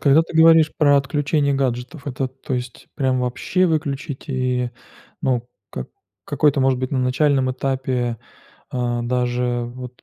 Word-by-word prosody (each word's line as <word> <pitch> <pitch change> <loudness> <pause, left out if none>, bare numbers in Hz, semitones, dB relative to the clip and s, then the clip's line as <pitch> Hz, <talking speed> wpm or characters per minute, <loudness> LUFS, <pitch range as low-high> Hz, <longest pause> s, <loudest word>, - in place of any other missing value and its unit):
когда 140 +2 +5
ты 165 - -6
говоришь 160 -1 +7
про 145 -2 +5
отключение 140 +1 0
гаджетов, 135 +3 -2
это, 130 -1 -2
то 130 +1 -9
есть, 125 -1 -5
прям 130 -2 +1
вообще 125 +9 0
выключить 145 -3 -2
и, 125 -2 0 0.5
ну, 125 -2 0 0.2
как 65 - -6 0.4
какой-то, 145 -2 +2
может 130 -1 +2
быть, 130 0 -3
на 135 - 0
начальном 130 +1 +2
этапе, 130 -3 -1 0.5
а 120 -1 -1
даже 125 0 0
вот 125 -1 -9
130 Hz, 145 wpm, -21 LUFS, 125-140 Hz, 0.5 s, говоришь